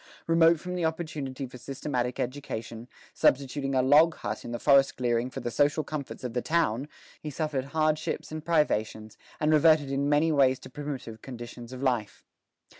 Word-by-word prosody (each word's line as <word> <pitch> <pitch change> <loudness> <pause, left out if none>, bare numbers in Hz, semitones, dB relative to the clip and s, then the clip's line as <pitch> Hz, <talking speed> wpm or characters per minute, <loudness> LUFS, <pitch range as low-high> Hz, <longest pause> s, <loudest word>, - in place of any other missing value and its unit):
Remote 165 0 +4
from 180 +2 -6
the 180 -1 -2
opportunity 155 -5 -3
for 125 0 -11
systematic 125 -2 -3
education, 120 -3 -5 0.3
substituting 135 0 +1
a 130 - +3
log 155 +5 +5
hut 105 0 -5
in 120 - -7
the 120 - -2
forest 140 +1 +4
clearing 120 0 0
for 125 - -7
the 120 - -3
social 145 +5 +2
comforts 150 -4 -6
of 125 -2 -4
the 125 - 0
town, 150 -5 0 0.3
he 155 - -5
suffered 145 -2 -2
hardships 155 +2 -1
and 155 -1 -5
privations, 110 -10 0 0.2
and 155 0 +2
reverted 155 -2 +4
in 140 +1 0
many 150 +2 +3
ways 135 -3 +4
to - - -13
primitive 130 -6 -6
conditions 120 -1 -9
of 130 +1 -7
life. 120 -6 -1
140 Hz, 175 wpm, -28 LUFS, 125-155 Hz, 0.3 s, log